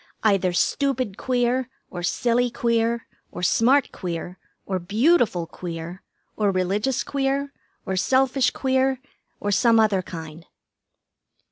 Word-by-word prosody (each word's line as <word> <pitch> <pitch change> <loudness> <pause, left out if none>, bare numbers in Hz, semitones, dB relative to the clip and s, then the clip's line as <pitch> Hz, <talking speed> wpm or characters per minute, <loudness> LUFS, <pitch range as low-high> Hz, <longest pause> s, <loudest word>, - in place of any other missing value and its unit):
Either 195 -4 +3
stupid 255 +3 0
queer, 250 +1 0 0.2
or 175 - -5
silly 240 +7 +1
queer, 235 0 0 0.3
or 180 - -7
smart 255 +9 +3
queer, 175 +1 -5 0.3
or 190 -1 -2
beautiful 210 - +2
queer, 170 +1 -7 0.3
or 210 -2 +1
religious 200 +7 0
queer, 275 0 -1 0.3
or 190 -2 -2
selfish 260 +5 +2
queer, 265 -1 0 0.4
or 205 - -2
some 230 +2 +4
other 210 -4 +3
kind. 165 -2 -9
225 Hz, 115 wpm, -24 LUFS, 185-260 Hz, 0.4 s, some